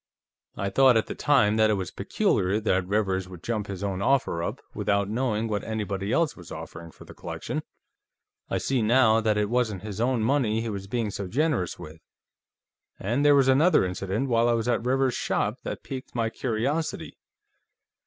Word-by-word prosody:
"I 100 0 -2
thought, 130 +1 +5
at 110 - +1
the - - -5
time, 110 -8 +3
that 110 0 +4
it 105 - +3
was 95 -2 -4
peculiar 95 +4 0
that 95 -4 0
Rivers 95 -2 0
would 90 -2 -11
jump 110 -3 -2
his 100 -1 -6
own 95 -1 -2
offer 125 -8 +1
up, - - -3
without 100 -1 0
knowing 115 0 -1
what 105 -2 -2
anybody 105 -2 -3
else 165 -3 +1
was 90 -3 -13
offering 80 +1 -8
for - - -15
the - - -12
collection. - - -5 0.9
I - - 0
see, 130 -3 0
now, 115 0 +4
that 110 -1 +1
it 105 0 +1
wasn't 110 -5 -1
his 105 0 -5
own 120 -2 +1
money 115 -3 +1
he 115 - -3
was 100 -2 -5
being 115 -1 -2
so 100 -1 -5
generous 130 - 0
with. 80 +1 -11 1.0
And 120 +8 0
there 145 -1 +6
was 135 -2 +4
another 140 - +4
incident, 95 +7 -2
while 120 -1 +3
I - - +3
was 115 0 -1
at 120 - +1
Rivers's 130 0 +1
shop, - - -1
that - - -6
piqued 130 -2 -7
my 115 -1 0
curiosity. 130 +8 -2
110 Hz, 190 wpm, -26 LUFS, 100-125 Hz, 1.0 s, there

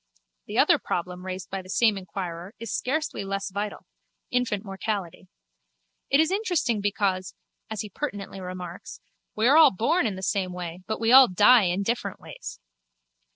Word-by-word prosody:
The - - -4
other - - +5
problem 180 +1 -4
raised 185 -1 -6
by 195 0 -3
the 185 - -15
same 220 +1 +3
inquirer 185 0 -6
is 230 -1 -6
scarcely 305 -2 -2
less 195 0 -3
vital: 205 +1 -4 0.5
infant 235 -5 0
mortality. 195 -2 -4 0.8
It 275 - +4
is 320 +2 +3
interesting 345 - 0
because, 190 -3 -1 0.3
as 220 -1 -3
he 210 - -7
pertinently 200 -6 -5
remarks, 180 -1 -8 0.4
we 220 +2 +2
are 285 +4 +6
all 320 - +9
born 235 - +1
in 200 - -3
the 190 - -8
same 190 -2 -1
way 175 -1 -6
but 220 - -2
we 225 +1 +2
all 260 0 +10
die 210 +4 +6
in 180 +3 0
different 235 +4 -2
ways. - - -9
200 Hz, 165 wpm, -26 LUFS, 185-230 Hz, 0.8 s, all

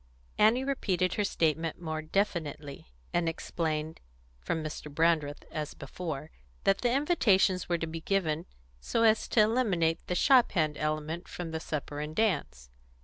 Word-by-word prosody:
Annie 225 +5 +5
repeated 190 -10 0
her 210 - 0
statement 160 -4 0
more 160 -2 -3
definitely, 155 - -2 0.3
and 170 -1 +2
explained, 160 -1 -3 0.4
from 160 - -2
Mr. 150 -1 -6
Brandreth, 155 -1 +1
as 155 -2 -4
before, 155 +1 -6 0.3
that 195 - +3
the 245 - +1
invitations 220 - +3
were 170 - +2
to 165 - -2
be 165 0 -6
given 165 -3 0 0.3
so 230 - 0
as 220 -1 +4
to 220 - +4
eliminate 200 -8 +2
the 180 - -1
shop 255 +3 +5
hand 155 -5 +1
element 155 +3 -2
from 175 -2 -6
the 160 - -3
supper 145 -2 -4
and 150 +1 -5
dance. 140 - -1
165 Hz, 150 wpm, -30 LUFS, 155-195 Hz, 0.4 s, Annie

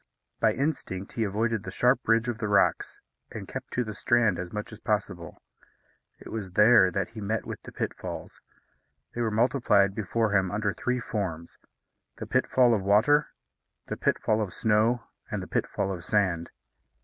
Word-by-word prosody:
By - - +3
instinct 115 -9 -3
he 115 - -1
avoided 110 +2 -1
the - - -7
sharp 125 +2 +1
ridge 115 +2 +3
of 120 -2 -3
the 110 - -2
rocks, 100 -1 +2 0.3
and - - -7
kept - - -7
to 125 - +1
the 110 -2 -6
strand 115 -4 +2
as 90 -1 -5
much 105 +1 -5
as 110 - -11
possible. 100 -7 -3 0.8
It - - -12
was 100 -5 -5
there 105 -2 +6
that 95 0 -2
he 110 -1 -9
met 110 +2 -2
with - - -7
the - - -11
pitfalls. - - -6 0.7
They 120 - -3
were 115 - +1
multiplied 110 -4 +3
before 110 +1 -1
him 95 -2 +2
under 105 +1 -1
three 125 +1 -1
forms: 90 -8 -5 0.6
the - - -7
pitfall 125 -2 +3
of 105 - +1
water, 110 +10 +4 0.6
the - - -2
pitfall 110 0 +1
of 95 -5 -4
snow, 110 +2 +2 0.3
and - - -3
the - - -8
pitfall 95 - -1
of 90 -3 -6
sand. 90 -5 0
105 Hz, 175 wpm, -27 LUFS, 100-115 Hz, 0.8 s, there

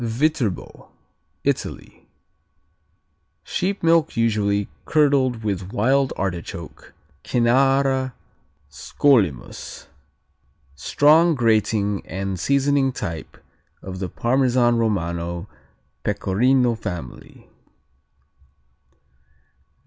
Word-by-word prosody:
Viterbo 120 - -2 0.5
Italy - - -4 1.4
Sheep 195 +1 -2
milk 165 -5 +3
usually 105 -3 +1 0.2
curdled 135 -6 +2
with 100 -2 -3
wild 130 +6 +2
artichoke, 85 -3 -6 0.3
Cynara 130 +2 +2 0.5
Scolymus. 75 - 0 0.9
Strong 150 - +4
grating 110 -4 +1
and 95 +1 -4
seasoning 140 +2 +2
type 85 -9 -6 0.5
of 95 -1 -7
the 95 -2 -3
Parmesan 120 +1 +2
Romano 85 -4 -2 0.6
Pecorino 125 +5 +2
family. 90 - -8
115 Hz, 65 wpm, -22 LUFS, 95-135 Hz, 1.4 s, Strong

